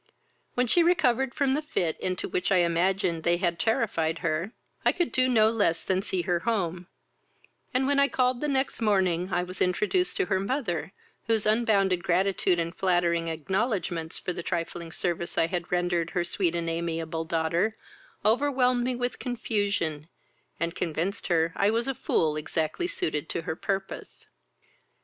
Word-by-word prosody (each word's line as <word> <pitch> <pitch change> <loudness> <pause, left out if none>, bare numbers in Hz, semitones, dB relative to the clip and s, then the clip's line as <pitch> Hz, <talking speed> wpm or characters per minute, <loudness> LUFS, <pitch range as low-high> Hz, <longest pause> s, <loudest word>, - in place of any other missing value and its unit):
"When 250 - +2
she 345 +9 +3
recovered 265 -8 +2
from 280 -3 +2
the 295 - 0
fit 175 - -1
into 185 -1 -2
which 180 - -1
I - - +5
imagined 175 0 +2
they 170 +1 +2
had 170 -2 -1
terrified 170 -8 +1
her, 165 +5 -1 0.3
I - - +5
could 350 - 0
do 255 0 +2
no 220 -3 +5
less 205 -8 +1
than 190 0 +1
see 190 -3 -1
her 175 -1 +1
home; 180 -5 -1 0.8
and, 255 +1 +1
when 280 +1 +2
I 280 - +5
called 255 -2 +1
the 300 - 0
next 270 -3 -1
morning, 190 -4 +1
I 175 +1 +1
was 180 +1 -8
introduced 210 - +1
to 390 - +2
her 190 - +1
mother, 195 - -2 0.4
whose 225 -2 +1
unbounded 210 -5 +3
gratitude 185 0 +2
and 170 +1 -2
flattering 175 -3 +1
acknowledgments, 175 - -2
for 180 - -3
the 175 - -5
trifling 170 -1 -4
service 170 0 -3
I - - +4
had 175 0 -4
rendered 175 -2 +1
her 175 - 0
sweet 175 -1 0
and 170 -1 -2
amiable 165 -1 -2
daughter, 165 +6 0 0.5
overwhelmed 250 +1 +3
me 250 0 -1
with 245 0 -3
confusion, 200 - -1 0.5
and 170 0 -1
convinced 175 +4 -2
her 165 -2 +2
I 200 - +3
was 230 +3 0
a 270 - 0
fool 155 -10 +1
exactly 155 - -1
suited 155 - -3
to 165 - -3
her 160 - -3
purpose. 195 +2 -4
185 Hz, 170 wpm, -27 LUFS, 170-230 Hz, 0.8 s, I